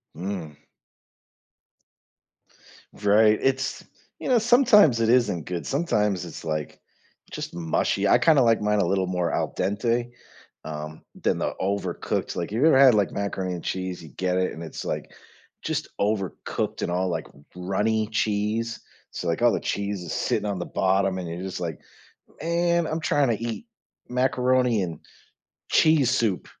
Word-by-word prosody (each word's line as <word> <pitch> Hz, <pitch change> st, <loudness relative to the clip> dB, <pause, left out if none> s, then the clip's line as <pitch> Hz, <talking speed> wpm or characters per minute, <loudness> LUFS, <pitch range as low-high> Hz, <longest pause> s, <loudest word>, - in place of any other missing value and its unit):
Mm. 85 Hz, -5 st, -5 dB, 2.4 s
Right, 105 Hz, +1 st, +4 dB
it's 135 Hz, 0 st, 0 dB, 0.4 s
you -, -, -5 dB
know, 250 Hz, -3 st, +4 dB
sometimes 215 Hz, -, +5 dB
it 115 Hz, -, +2 dB
isn't 115 Hz, -10 st, +2 dB
good. 90 Hz, -2 st, -4 dB
Sometimes 105 Hz, -, 0 dB
it's, 85 Hz, -, -9 dB
like, 75 Hz, -2 st, -4 dB, 0.5 s
just -, -, -6 dB
mushy. 80 Hz, -2 st, 0 dB
I -, -, +6 dB
kinda 155 Hz, -4 st, +4 dB
like 115 Hz, -2 st, +3 dB
mine 105 Hz, 0 st, +1 dB
a -, -, +2 dB
little 95 Hz, -1 st, 0 dB
more 90 Hz, -2 st, -1 dB
al -, -, -1 dB
dente, 115 Hz, +5 st, 0 dB, 0.6 s
um, 75 Hz, 0 st, -7 dB, 0.2 s
than -, -, +2 dB
the -, -, -2 dB
overcooked, 95 Hz, -2 st, -2 dB
like, 85 Hz, +2 st, -3 dB
you 115 Hz, +8 st, +2 dB
ever 155 Hz, -5 st, +6 dB
had, 130 Hz, -4 st, +7 dB
like, 100 Hz, -3 st, +2 dB
macaroni 95 Hz, -2 st, -2 dB
and 85 Hz, -, -6 dB
cheese, 95 Hz, -2 st, -4 dB
you 80 Hz, -, -11 dB
get 90 Hz, +6 st, -1 dB
it, 95 Hz, 0 st, +1 dB
and 80 Hz, -, -9 dB
it's, 80 Hz, -, -7 dB
like, -, -, -4 dB, 0.5 s
just -, -, -2 dB
overcooked 100 Hz, -2 st, -2 dB
and 85 Hz, -, -1 dB
all, 90 Hz, +1 st, 0 dB
like, 80 Hz, -2 st, -3 dB, 0.3 s
runny 105 Hz, +4 st, 0 dB
cheese, 110 Hz, +2 st, -1 dB, 0.3 s
so, 90 Hz, -, -5 dB
like, 85 Hz, -, -1 dB
all 120 Hz, -1 st, +5 dB
the -, -, 0 dB
cheese 100 Hz, -2 st, -3 dB
is 85 Hz, -, -7 dB
sitting -, -, -1 dB
on 100 Hz, -2 st, -3 dB
the 85 Hz, -, -3 dB
bottom, 95 Hz, 0 st, +1 dB
and 90 Hz, -2 st, -5 dB
you're 85 Hz, +2 st, -5 dB
just 95 Hz, -1 st, -5 dB
like, 80 Hz, -3 st, -4 dB, 0.6 s
"Man, 170 Hz, 0 st, +1 dB
I'm 155 Hz, +1 st, -2 dB
tryna 135 Hz, -8 st, +1 dB
eat 115 Hz, -, -4 dB, 0.4 s
macaroni 125 Hz, -2 st, +2 dB
and 85 Hz, -4 st, -5 dB, 0.7 s
cheese 155 Hz, -6 st, +4 dB
soup." 105 Hz, -6 st, 0 dB
100 Hz, 160 wpm, -25 LUFS, 90-120 Hz, 2.4 s, had